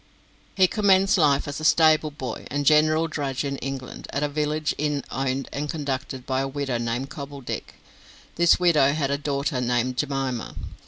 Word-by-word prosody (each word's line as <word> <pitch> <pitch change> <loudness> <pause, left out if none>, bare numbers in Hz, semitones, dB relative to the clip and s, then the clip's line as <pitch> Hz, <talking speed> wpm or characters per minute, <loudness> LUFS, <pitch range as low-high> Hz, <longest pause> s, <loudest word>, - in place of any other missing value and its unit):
He 190 - +5
commenced 195 -1 +3
life 145 -3 +3
as 145 0 -4
a - - -7
stable 155 -1 +4
boy 130 -5 -6
and 145 +1 -2
general 155 +2 +4
drudge 140 -4 -3
in 140 -1 -3
England, 135 -2 -6
at 140 - -2
a - - +2
village 150 +1 -1
inn 150 -1 -1
owned 135 0 -2
and 145 +1 -3
conducted 135 -4 -4
by 130 -1 0
a 135 - -1
widow 135 -3 -2
named 120 +4 -3
Cobbledick. 140 -2 -7 0.6
This 170 0 +4
widow 155 -6 +4
had 145 -3 -1
a 140 - 0
daughter 140 -2 -1
named 125 +1 0
Jemima. 135 -4 -2
140 Hz, 170 wpm, -24 LUFS, 135-155 Hz, 0.6 s, He